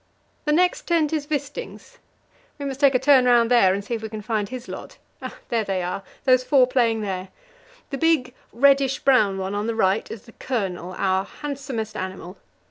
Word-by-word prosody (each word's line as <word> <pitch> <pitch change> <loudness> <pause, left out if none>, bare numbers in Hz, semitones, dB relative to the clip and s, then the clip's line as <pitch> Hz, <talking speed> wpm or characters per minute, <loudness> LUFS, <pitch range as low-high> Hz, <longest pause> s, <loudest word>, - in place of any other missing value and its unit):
The 300 - +1
next 360 +4 +1
tent 325 -3 +1
is 295 -2 -2
Wisting's. 295 - -5 0.6
We 285 - -6
must 270 -1 -4
take 280 -2 +4
a - - +7
turn 260 0 +5
round 240 -1 +4
there 235 -7 +5
and 200 +1 -3
see 235 - -4
if 225 - -3
we 220 - -6
can 215 -1 -7
find 215 -1 -2
his 255 0 -7
lot. - - -9 0.5
There 230 -2 +1
they 190 -3 -2
are 180 +2 -3 0.2
those 255 -1 +4
four 265 -1 +4
playing 235 -3 +1
there. 190 -2 -4 0.6
The 275 - -3
big, 310 -7 +2 0.2
reddish 275 +1 +3
brown 215 -8 +3
one 190 +1 -3
on 205 +2 -2
the 230 - -2
right 195 -1 +1
is 225 - -8
the 230 - -16
Colonel, 190 -8 -4
our 190 0 +1
handsomest 265 -6 -6
animal. 185 -1 -6
240 Hz, 195 wpm, -23 LUFS, 200-275 Hz, 0.6 s, a